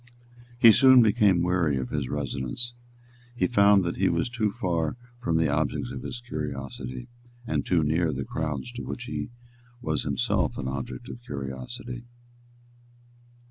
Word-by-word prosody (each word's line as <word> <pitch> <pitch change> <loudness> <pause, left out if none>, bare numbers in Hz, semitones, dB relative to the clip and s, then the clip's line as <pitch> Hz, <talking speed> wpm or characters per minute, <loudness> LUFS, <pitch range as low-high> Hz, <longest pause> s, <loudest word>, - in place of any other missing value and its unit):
He 115 -2 +9
soon 130 +1 +7
became 105 -5 +4
weary 90 -6 +2
of 65 -2 -4
his 70 -4 -2
residence. 70 - -2 0.6
He - - +1
found 100 -4 +5
that 85 0 -2
he - - +3
was 85 +7 0
too 110 -4 0
far 85 -6 -1 0.2
from 85 -10 0
the 80 -1 +3
objects 75 0 -1
of 65 - -6
his 120 - -6
curiosity, 70 - -5 0.4
and - - -1
too 85 -3 +2
near 80 +3 +2
to 75 - -1
the - - -3
crowds 75 - -3
to 120 0 -6
which 120 - -5
he 125 - -4 0.5
was 120 - -1
himself 70 -4 0
an 65 - -3
object 65 - -5
of 120 - -8
curiosity. 95 - -6
85 Hz, 155 wpm, -27 LUFS, -, 0.6 s, He